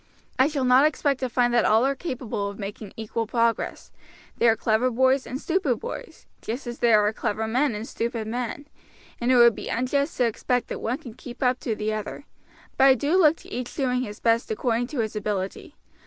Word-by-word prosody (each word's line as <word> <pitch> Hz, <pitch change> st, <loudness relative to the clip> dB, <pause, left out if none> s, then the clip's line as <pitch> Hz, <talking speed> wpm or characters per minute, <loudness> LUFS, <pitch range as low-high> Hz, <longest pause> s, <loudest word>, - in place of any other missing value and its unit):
I 260 Hz, -, +6 dB
shall 290 Hz, -3 st, -2 dB
not 255 Hz, +2 st, +6 dB
expect 285 Hz, -3 st, 0 dB
to 255 Hz, -, -2 dB
find 245 Hz, 0 st, +2 dB
that 240 Hz, -, +4 dB
all 220 Hz, +4 st, +4 dB
are 275 Hz, -, +2 dB
capable 250 Hz, -9 st, -4 dB
of 200 Hz, -, -9 dB
making 205 Hz, 0 st, -7 dB
equal 225 Hz, 0 st, -3 dB
progress; 230 Hz, 0 st, -1 dB, 0.5 s
there 235 Hz, -, +5 dB
are -, -, +1 dB
clever 225 Hz, +3 st, +1 dB
boys 260 Hz, +2 st, +2 dB
and 255 Hz, -, -4 dB
stupid 325 Hz, -8 st, 0 dB
boys, -, -, -8 dB, 0.2 s
just 240 Hz, +6 st, -5 dB
as 240 Hz, 0 st, -6 dB
there 215 Hz, -3 st, +4 dB
are 210 Hz, -, +1 dB
clever 220 Hz, +1 st, -2 dB
men 250 Hz, +2 st, +1 dB
and 215 Hz, +3 st, -5 dB
stupid 230 Hz, -1 st, -3 dB
men, 245 Hz, +5 st, -4 dB, 0.5 s
and 240 Hz, +2 st, +1 dB
it -, -, +5 dB
would 235 Hz, -1 st, +7 dB
be -, -, -7 dB
unjust 280 Hz, +5 st, -1 dB
to 250 Hz, -, +3 dB
expect 245 Hz, +2 st, -1 dB
that -, -, -5 dB
one 240 Hz, +3 st, -1 dB
can 240 Hz, -5 st, -11 dB
keep 245 Hz, +2 st, -8 dB
up 250 Hz, 0 st, +2 dB
to 225 Hz, -, -2 dB
the 215 Hz, +1 st, -2 dB
other; 215 Hz, +6 st, -5 dB, 0.5 s
but 270 Hz, -, +5 dB
I 265 Hz, -1 st, +7 dB
do 285 Hz, +8 st, 0 dB
look 325 Hz, -4 st, +5 dB
to -, -, -12 dB
each 245 Hz, 0 st, -5 dB
doing 250 Hz, -3 st, 0 dB
his 210 Hz, -4 st, -6 dB
best 230 Hz, 0 st, +1 dB
according 235 Hz, +2 st, 0 dB
to 265 Hz, -3 st, -2 dB
his 220 Hz, -1 st, -4 dB
ability. 210 Hz, -, -4 dB
240 Hz, 215 wpm, -25 LUFS, 220-265 Hz, 0.5 s, would